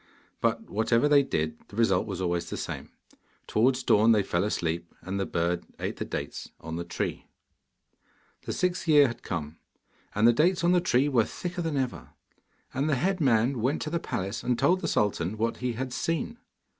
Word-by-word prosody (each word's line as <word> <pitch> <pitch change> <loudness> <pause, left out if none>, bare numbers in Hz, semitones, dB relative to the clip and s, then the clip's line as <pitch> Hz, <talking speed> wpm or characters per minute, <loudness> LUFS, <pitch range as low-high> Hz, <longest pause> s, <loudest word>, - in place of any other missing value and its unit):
But 115 0 +1
whatever 115 +5 +2
they 145 -1 +6
did, 80 - -2
the - - -13
result 105 -5 +2
was 95 -4 -4
always 85 -1 -1
the - - -4
same. - - -5 0.6
Towards 125 +3 +2
dawn 110 0 +5
they 105 -2 +3
fell 85 -1 0
asleep, 85 -4 -2
and 95 +2 -4
the 95 - -1
bird 85 +1 0 0.2
ate - - -3
the - - -3
dates - - -5
on 80 0 -6
the 85 - -3
tree. 85 - -4 1.2
The - - -1
sixth 180 -1 -1
year 150 -2 +7
had 120 -2 -4
come, 80 -3 -5 0.6
and 105 +2 +5
the 120 - +6
dates 175 +8 +2
on 175 - +4
the 180 -1 +4
tree 140 -5 +3
were 120 -6 +3
thicker 180 0 -5
than 160 -4 -1
ever. 130 -2 -3 0.6
And 140 +4 0
the 145 - +3
head 185 +7 0
man 120 -1 +3
went 130 +6 +1
to 155 - -4
the 170 - 0
palace 100 - -3
and 125 -1 0
told 175 +9 +3
the 165 - -1
sultan 105 - 0
what 115 +2 -1
he 125 -1 -2
had 130 +2 -4
seen. 165 - -2
115 Hz, 195 wpm, -28 LUFS, 95-145 Hz, 1.2 s, year